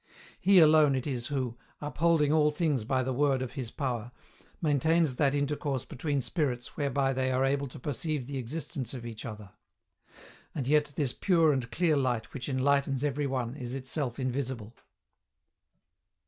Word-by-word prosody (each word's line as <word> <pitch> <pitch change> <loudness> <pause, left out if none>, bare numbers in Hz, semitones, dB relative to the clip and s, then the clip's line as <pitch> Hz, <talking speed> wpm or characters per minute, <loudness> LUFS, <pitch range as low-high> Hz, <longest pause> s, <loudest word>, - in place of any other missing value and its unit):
He 195 +1 +5
alone 155 -4 +6
it 130 - -2
is 125 -4 -2
who, 130 -4 -3 0.2
"upholding 150 0 +2
all 150 -1 +4
things 150 -6 0
by 130 +2 +1
the 130 +1 -1
word 135 -1 +2
of 130 - -5
His 130 -5 -5
power," 120 -4 -3 0.5
maintains 155 -1 +2
that 140 -1 +2
intercourse 145 -2 -1
between 140 0 -2
spirits 125 -3 -2
whereby 140 -2 +1
they 130 0 0
are 130 +1 +2
able 140 +1 0
to 130 - -11
perceive 145 +1 -3
the 135 +1 -4
existence 135 +1 -4
of 120 -2 -7
each 115 -2 -7
other. 105 -3 -8 1.0
And 135 -5 -2
yet 150 0 +2
this 140 -5 0
pure 165 -5 +3
and 125 -3 -2
clear 165 +2 +2
light 125 -5 -1
which 130 0 -5
enlightens 140 0 +1
every 145 0 0
one 130 -2 -2
is 125 -3 -6
itself 130 -1 -3
invisible. 130 -3 -3
135 Hz, 160 wpm, -29 LUFS, 125-150 Hz, 1.0 s, alone